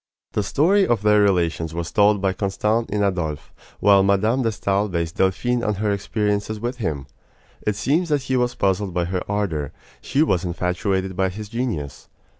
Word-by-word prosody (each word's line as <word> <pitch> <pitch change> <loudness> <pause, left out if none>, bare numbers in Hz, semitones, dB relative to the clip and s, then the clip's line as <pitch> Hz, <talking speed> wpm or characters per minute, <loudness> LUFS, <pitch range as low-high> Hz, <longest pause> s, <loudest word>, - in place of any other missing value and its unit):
The - - 0
story 185 - +3
of 115 -3 +1
their 105 0 +5
relations 85 -4 +1
was 85 -1 -4
told 105 -1 +3
by 95 -1 +2
Constant 105 +4 -1
in 105 0 0
Adolphe, 85 -7 -2 0.3
while 100 -1 +5
Mme. 100 +6 +2
de 115 -2 +1
Stael 100 -1 0
based 85 -2 -3
Delphine 120 +6 +1
on 105 - 0
her 105 +1 0
experiences 105 +1 -1
with 120 +3 -3
him. 75 - -3 0.6
It 105 - +2
seems 160 - 0
that 145 -3 +1
he 130 -1 -1
was 125 -1 +1
puzzled 95 -1 0
by 90 -1 +1
her 90 +1 -2
ardor; 90 -9 -1 0.3
she 145 - +1
was 95 - +1
infatuated 95 +2 -1
by 95 0 +1
his 105 +2 -8
genius. 110 - -4
100 Hz, 180 wpm, -22 LUFS, 90-110 Hz, 0.6 s, their